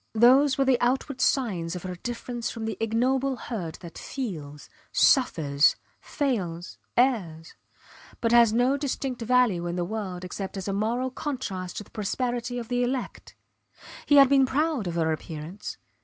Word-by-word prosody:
Those 260 +5 +5
were 275 - +2
the 260 -2 +3
outward 260 +2 0
signs 185 -10 0
of 180 - -6
her 185 -1 -4
difference 240 +4 -4
from 225 -1 -5
the 220 -2 -3
ignoble 255 +4 +1
herd 195 -9 -5
that 170 -2 -9
feels, 155 - -6 0.2
suffers, 150 - +4 0.2
fails, 185 - -3 0.2
errs 190 -11 +1 0.7
but 230 - 0
has 235 -2 +6
no 245 +5 +2
distinct 270 -3 -3
value 230 -7 +2
in 175 - -3
the 175 -1 -1
world 185 -3 -5
except 190 +2 -5
as 190 - -5
a 195 - -1
moral 235 +6 -1
contrast 215 - -4
to - - -4
the - - -23
prosperity 240 +3 -2
of 235 -2 -5
the 245 +1 0
elect. 250 +1 -3 0.7
He 290 - +5
had 275 -1 +9
been 270 -1 +4
proud 290 - 0
of 170 - -3
her 160 -1 +1
appearance. 160 +4 -6
230 Hz, 160 wpm, -26 LUFS, 180-255 Hz, 0.7 s, had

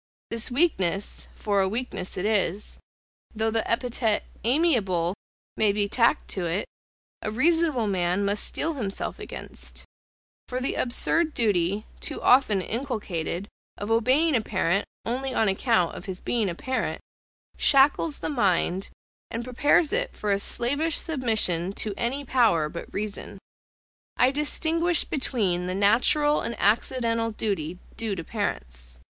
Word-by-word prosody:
This 230 -1 0
weakness, 205 - 0
for 200 -2 0
a 190 - +1
weakness 200 -4 -3
it 185 - -2
is, 205 -2 0 0.6
though 220 +1 0
the 225 0 -1
epithet 230 -2 0 0.2
AMIABLE 220 - +2 0.4
may 215 -2 +4
be 205 0 0
tacked 235 +7 +2
to 180 -3 -1
it, 175 +5 -1 0.6
a - - -2
reasonable 305 +1 +2
man 185 0 0
must 200 +1 0
steel 330 - -1
himself 210 -9 -3
against; - - -7 0.6
for 255 - -3
the 255 - -1
absurd 310 +6 +1
duty, 200 -2 +1
too - - -3
often 245 -6 +4
inculcated, 205 - -3 0.3
of 205 +2 -4
obeying 260 +8 +3
a 230 - +3
parent 195 -2 0 0.2
only 255 +2 -2
on 220 - +3
account 195 -2 +2
of 180 - -8
his 190 -2 -5
being 225 -5 0
a 170 - -4
parent, 260 +7 -2 0.6
shackles 285 +2 +4
the - - -2
mind, 190 - +1 0.4
and 230 +1 -4
prepares 290 - +2
it - - -1
for 210 - -1
a 200 - +2
slavish 285 +10 +1
submission 220 - +1
to 210 0 -1
any 260 +6 -2
power 220 -13 +3
but 170 - -8
reason. 205 0 -5 0.8
I 255 +1 +5
distinguish 325 +3 +1
between 195 - -1
the 185 - -2
natural 250 +9 +3
and 235 - -3
accidental 230 +2 +1
duty 190 -6 -3 0.2
due 220 -3 -2
to 165 - -5
parents. 60 - -4
220 Hz, 140 wpm, -26 LUFS, 195-260 Hz, 0.8 s, I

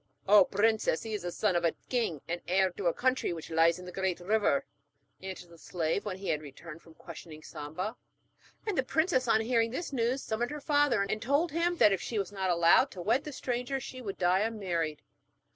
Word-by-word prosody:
'Oh, 200 -1 +7
princess, 215 -4 +1
he 225 -1 -5
is 210 - -2
the 175 0 -4
son 195 0 0
of 175 - +1
a 165 - +2
king, 225 - -1
and 175 +1 -3
heir 190 +1 +3
to 180 +1 -3
a - - +4
country 255 -7 0
which 165 -1 -8
lies 165 +1 +4
near 180 - -10
the 180 - -8
Great 190 -1 -1
River,' 220 +8 +1 0.6
answered 185 -2 -8
the 170 - -15
slave, 165 +3 -2
when 190 -3 -4
he 195 0 -5
had 150 - 0
returned 155 +3 -11
from 165 -1 -18
questioning 160 -2 -11
Samba. 180 +10 -5 0.7
And 420 -3 -1
the 265 - +3
princess 315 -2 +1
on 220 -1 +4
hearing 230 0 +1
this 285 +5 -5
news 250 +2 0
summoned 230 +2 -2
her 300 +1 -5
father, 290 -7 +2
and 215 +2 -2
told 285 +7 +1
him 340 +2 0
that 210 - +6
if 190 - -2
she 230 - -4
was 195 -1 -2
not 190 -2 -2
allowed 170 +9 +5
to 180 - -7
wed 245 - +1
the 300 - -5
stranger 250 0 -2
she 255 0 -8
would 200 -5 -5
die 180 +1 +3
unmarried. 180 -8 -2
200 Hz, 220 wpm, -30 LUFS, 175-250 Hz, 0.7 s, Oh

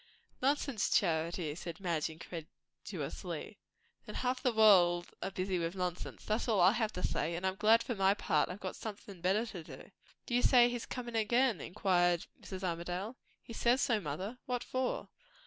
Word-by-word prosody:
"Nonsense, 275 -4 +1
Charity!" 165 -2 +1
said 170 0 -7
Madge 170 -5 -1
incredulously. 165 +1 -7 0.5
"Then - - -7
half 255 0 -1
the 250 - +2
world 180 -6 +5
are - - -2
busy 185 -1 -2
with 170 +2 -2
nonsense, 180 -1 -4
that's 215 +3 0
all 220 -4 +2
I 180 +2 +7
have 220 -1 0
to 180 - -5
say; 170 +2 0
and 175 +2 -3
I'm 190 - +1
glad 220 +3 +5
for 245 - -2
my 195 -1 +3
part - - +1
I've 185 0 -5
somethin' 200 -4 -8
better 195 +6 +2
to 185 -7 -7
do." - - -12 0.3
"Do 240 - -5
you 245 - +4
say 245 -1 +6
he's 245 -1 -4
comin' 240 -2 -5
again?" 225 - +2
inquired 175 -2 +1 0.2
Mrs. 190 -1 -7
Armadale. 180 +6 -3 0.3
"He 230 - -9
says 240 +3 +3
so, 235 -6 +2
mother." 185 - -5
"What 245 -1 -1
for?" 255 0 -2
195 Hz, 175 wpm, -33 LUFS, 175-235 Hz, 0.5 s, I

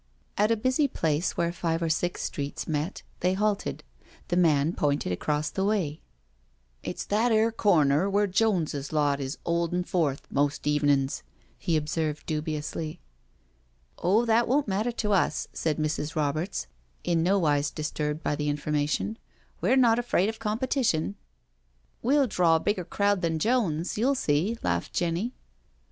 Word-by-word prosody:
*' - - -38
At 210 +1 +4
a 230 - +2
busy 260 +6 +2
place 160 - -1
where 170 0 +1
five 165 -2 -1
or 165 - -1
six 175 +2 -1
streets 140 -1 -4
met, 155 +4 -2 0.2
they 185 +1 +1
halted. 210 0 -1 0.5
The 175 - +1
man 160 -3 +3
pointed 145 - 0
across 150 - -1
the 190 - -1
way: 190 -8 0 0.4
" - - -40
It's - - -4
that 225 +4 +2
'ere 220 +1 +3
corner 170 -5 +3
wh6re 200 0 +1
Joneses 175 -10 0
lot 145 -2 +2
is 135 +1 -4
'oldin' 170 +1 0
forth, 160 -7 -1
most 145 +1 0
evenin's," 145 -2 +2 0.4
he 165 -2 +1
observed 155 0 -2
dubiously. 155 0 -3 0.5
" - - -39
Oh, 205 +7 +3
that 230 +1 +3
won't 275 +2 +2
matter 210 +5 0
to 225 -2 -2
us/' 180 -5 +1
said 155 -2 -1
Mrs. 155 0 -2
Roberts, 155 +5 -1 0.4
in 170 -2 +1
nowise 160 -6 +2
disturbed 150 0 -3
by 145 - 0
the 150 0 -1
information: 150 +8 -1 0.4
"we're - - +3
not 235 -2 +5
afraid 220 -5 +1
of 220 - -6
competition.'* 220 - 0 0.5
" - - -41
We'll 280 +3 +3
draw 180 -7 +3
a - - +3
bigger 185 0 -1
crowd 200 0 +1
than 165 -1 0
Jones, 190 -5 0
you'll 270 +5 +3
see," 180 - +1
laughed 85 -1 -1
Jenny. 175 +8 -1
165 Hz, 155 wpm, -27 LUFS, 150-205 Hz, 0.5 s, not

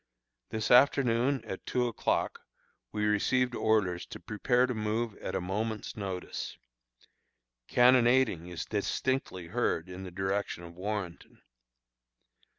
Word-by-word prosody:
This 110 -1 -2
afternoon, 125 0 +4
at 95 - -6
two 125 -1 +1
o'clock, 115 - -1 0.5
we 105 -1 -1
received 125 +4 +2
orders 105 -7 +1
to - - -8
prepare 120 +4 +1
to 130 - -2
move 110 0 -1
at - - -5
a - - +1
moment's 105 +4 -3
notice. 95 -3 -5 1.1
Cannonading 125 -7 +4
is 90 -2 -5
distinctly 105 -2 -1
heard 95 -6 0
in 90 +1 -7
the 95 - -6
direction 95 0 -2
of 85 0 -10
Warrenton. 95 -2 -5
105 Hz, 120 wpm, -30 LUFS, 95-120 Hz, 1.1 s, afternoon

